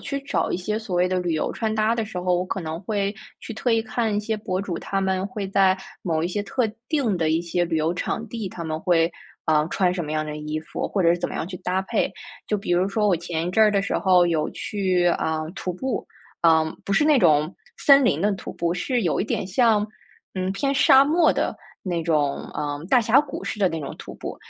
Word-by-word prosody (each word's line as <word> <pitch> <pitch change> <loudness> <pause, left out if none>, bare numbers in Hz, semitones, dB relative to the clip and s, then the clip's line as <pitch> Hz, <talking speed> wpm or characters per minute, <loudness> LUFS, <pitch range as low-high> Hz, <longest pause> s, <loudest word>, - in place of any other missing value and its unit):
去 280 0 -4
找 275 - -1
一 - - 0
些 210 +4 -2
所 195 -5 -4
谓 180 +1 +3
的 185 0 0
旅 175 -2 -1
游 155 - -1
穿 220 -2 -2
搭 220 +1 +2
的 230 -2 -1
时 200 -4 -6
候， 180 0 +1
我 175 +1 0
可 185 +1 -4
能 160 0 -5
会 200 0 -1 0.3
去 - - -7
特 240 +3 -1
意 225 - +3
看 220 -1 -1
一 - - +1
些 215 +1 -2
博 195 -3 -3
主， 185 -4 -4
他 195 - -2
们 190 0 0
会 210 -5 -4
在 190 -1 +3 0.3
某 160 -3 0
一 - - +1
些 205 +3 -2
特 240 +3 0 0.2
定 265 - +1
的 160 -2 +1
一 160 +1 +2
些 175 +1 -1
旅 165 -1 -1
游 160 +2 +1
场 225 +5 -3
地， 225 -3 -4
他 170 -2 -7
们 155 -1 -3
会， 170 -2 +2 0.3
啊， 155 -1 +3
穿 180 +1 +1
什 175 -3 -3
么 150 - -6
样 155 0 -1
的 150 0 -5
衣 150 0 -4
服 155 - -4
或 200 - -1
者 170 - +5
是 175 - +2
怎 - - -2
么 - - -7
样 - - -3
去 180 0 -6
搭 185 +1 -1
配。 190 - 0 0.4
就 210 - +1
比 195 -3 -2
如 180 +2 +2
说 210 +1 +1
我 190 - +3
前 165 0 -3
一 - - -1
阵 220 - +5
儿 215 - +6
的 200 -1 +2
时 195 - -1
候 180 -2 +4
有 165 -3 0
去， 185 -4 0
啊， 160 -1 -1 0.2
徒 190 -4 -3
步， 255 +7 -3 0.4
啊， 160 -1 +5 0.2
不 200 - -2
是 200 - +3
那 300 -2 +5
种 150 0 +3 0.2
森 275 -1 +6
林 160 -10 +2
的 205 +3 +2
徒 195 - -6
步， 170 0 -1
是 245 +6 -1
有 170 - +1
一 - - 0
点 205 - -2
像 215 +1 +3 0.5
嗯， 185 0 -1
偏 275 +8 -1
沙 270 0 +6
漠 320 +3 +4
的 - - -1 0.3
那 175 -3 -2
种， 150 -4 0
嗯， 145 +1 -3
大 250 - +5
峡 230 +3 +4
谷 290 -2 -7
似 - - -4
的 200 - +3
那 165 - -3
种 140 - -6
徒 - - -9
步， - - -6
185 Hz, 270 characters per minute, -24 LUFS, 170-215 Hz, 0.5 s, 儿